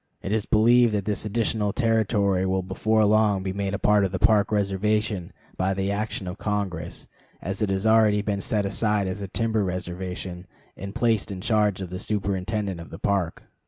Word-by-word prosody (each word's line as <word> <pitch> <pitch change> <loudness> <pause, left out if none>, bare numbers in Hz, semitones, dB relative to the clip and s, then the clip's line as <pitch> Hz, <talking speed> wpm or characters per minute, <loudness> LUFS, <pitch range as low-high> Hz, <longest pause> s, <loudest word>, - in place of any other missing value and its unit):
It 95 - -3
is 110 -1 0
believed 115 +1 +4
that 100 -2 -2
this 105 0 -2
additional 105 -1 0
territory 105 -5 +1
will 95 0 0
before 110 +4 +1
long 105 -2 +3
be 95 -1 -3
made 100 0 -2
a - - -1
part 105 0 +3
of 95 - 0
the 95 - -2
Park 105 +3 +3
reservation 105 -1 0 0.3
by 95 +1 0
the 95 +1 -1
action 105 -2 -3
of 90 +3 -6
Congress, 100 -5 -3 0.3
as 95 +3 -5
it 105 - +1
has 95 +1 -1
already 110 -2 +4
been 100 -2 -2
set 105 0 0
aside 105 0 +1
as 95 +2 -4
a 100 - -4
timber 110 +1 0
reservation 90 0 -5 0.3
and 100 +1 -8
placed 115 -4 +1
in 95 - -5
charge 105 -1 +1
of 90 -2 -6
the 90 - -4
superintendent 100 -1 -2
of 85 - -11
the 80 - -8
Park. 100 -4 -1
100 Hz, 195 wpm, -25 LUFS, 95-110 Hz, 0.3 s, believed